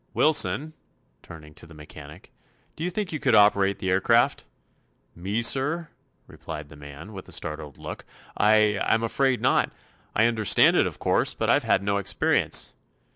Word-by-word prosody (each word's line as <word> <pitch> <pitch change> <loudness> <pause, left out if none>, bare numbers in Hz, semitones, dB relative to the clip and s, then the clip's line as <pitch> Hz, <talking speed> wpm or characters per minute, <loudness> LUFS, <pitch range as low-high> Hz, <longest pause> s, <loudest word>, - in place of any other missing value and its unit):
"Wilson," 155 0 +2 0.5
turning 75 -2 -13
to 80 - -10
the 80 - -15
mechanic, 75 0 -13 0.4
"do 160 - -6
you 180 - -1
think 185 -1 -4
you 155 - -3
could 125 -5 +2
operate 100 -1 +4
the 95 - -3
aircraft?" 115 +6 +2 0.7
"Me, 100 +7 -3
sir?" 150 +7 0 0.4
replied 75 -2 -9
the 75 - -13
man, 75 +7 -11
with 95 -2 -10
a - - -9
startled 75 -3 -5
look; - - -8 0.3
"I—I'm 105 +1 +2
afraid 130 +2 0
not. - - +1 0.4
I 110 - +3
understand 110 -3 +3
it, - - +3
of - - -8
course; - - 0
but - - 0
I've - - +2
had 95 - +1
no 100 0 0
experience." 100 - 0
105 Hz, 160 wpm, -25 LUFS, 80-120 Hz, 0.7 s, operate